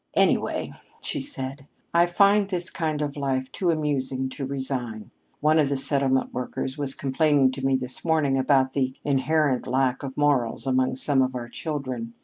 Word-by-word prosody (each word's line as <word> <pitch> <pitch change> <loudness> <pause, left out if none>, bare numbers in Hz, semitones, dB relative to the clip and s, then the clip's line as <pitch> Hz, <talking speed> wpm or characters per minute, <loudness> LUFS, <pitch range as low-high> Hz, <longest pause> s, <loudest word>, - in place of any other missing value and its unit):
"Anyway," - - +1 0.3
she 300 - -3
said, 135 - -5 0.3
"I 170 +1 +5
find 200 +3 +4
this 180 -3 -1
kind 155 -2 -1
of 145 -1 -4
life 135 -2 -2
too 180 - -1
amusing 135 -4 0
to 135 0 -5
resign. 130 -5 -4 0.3
One 155 +1 +4
of 145 -3 +3
the 140 - 0
settlement 135 -1 +1
workers 125 +1 -4
was 140 -2 -2
complaining 140 -1 +2
to 135 +1 -6
me 135 0 +3
this 130 -1 -2
morning 155 -5 +2
about 130 0 +2
the 130 -2 0
inherent 145 -1 +1
lack 130 -1 +1
of 135 -2 -7
morals 140 -6 +1
among 130 -1 +1
some 135 +1 +2
of 130 0 0
our 120 -1 -5
children. 130 -6 -5
135 Hz, 170 wpm, -25 LUFS, 130-150 Hz, 0.3 s, I